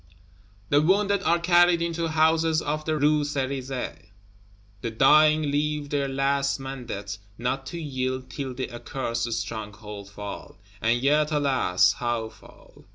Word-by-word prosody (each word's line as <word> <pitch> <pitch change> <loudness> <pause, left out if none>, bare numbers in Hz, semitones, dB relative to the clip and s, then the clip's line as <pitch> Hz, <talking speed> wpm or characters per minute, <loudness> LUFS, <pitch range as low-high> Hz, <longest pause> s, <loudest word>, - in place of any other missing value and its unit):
The 145 - +4
wounded 200 +4 +2
are 170 -2 +3
carried 175 0 +4
into 170 0 -1
houses 160 0 +3
of 155 0 -3
the 155 -1 0
Rue 150 +1 +3
Cerisaie; 135 -5 -4 0.7
the 115 - -2
dying 150 +5 +4
leave 150 0 -1
their 140 -1 0
last 140 +1 0
mandate 120 -6 -6 0.2
not 130 +2 -2
to 170 - -5
yield 130 -4 -3
till 130 -1 -5
the 130 0 -4
accursed 120 -1 -3
Stronghold 105 -2 -6
fall. 100 -1 -8 0.2
And 115 +2 +2
yet, 150 +3 +2
alas! 135 -11 +3
how 120 -2 -2
fall? 110 0 -18
140 Hz, 135 wpm, -25 LUFS, 120-155 Hz, 0.7 s, The